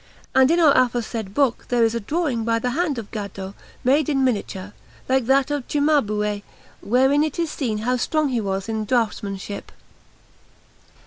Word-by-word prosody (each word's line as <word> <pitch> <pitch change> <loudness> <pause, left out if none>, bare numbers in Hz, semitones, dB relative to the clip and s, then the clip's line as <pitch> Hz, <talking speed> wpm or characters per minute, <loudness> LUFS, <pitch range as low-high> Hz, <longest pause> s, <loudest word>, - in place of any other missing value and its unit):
And 265 0 +5
in 335 +2 +3
our 305 -4 +6
aforesaid 235 -5 0
book 275 -5 +1
there 245 -1 +3
is 225 0 +2
a 235 - -1
drawing 265 0 -1
by 230 0 +1
the 245 +2 -1
hand 315 -1 0
of 225 -3 -7
Gaddo, 200 -3 -6 0.3
made 275 +4 +3
in 270 -2 +1
miniature, 205 -5 -2 0.3
like 260 -2 +1
that 270 +1 +3
of 290 -4 -2
Cimabue, 215 -9 +1 0.4
wherein 265 +7 +3
it 310 0 -3
is 335 -3 -1
seen 230 -7 -2
how 250 +4 0
strong 305 +4 0
he 245 -3 0
was 195 -1 -3
in 220 -1 -2
draughtsmanship. 205 -4 -2
245 Hz, 170 wpm, -22 LUFS, 210-280 Hz, 0.4 s, our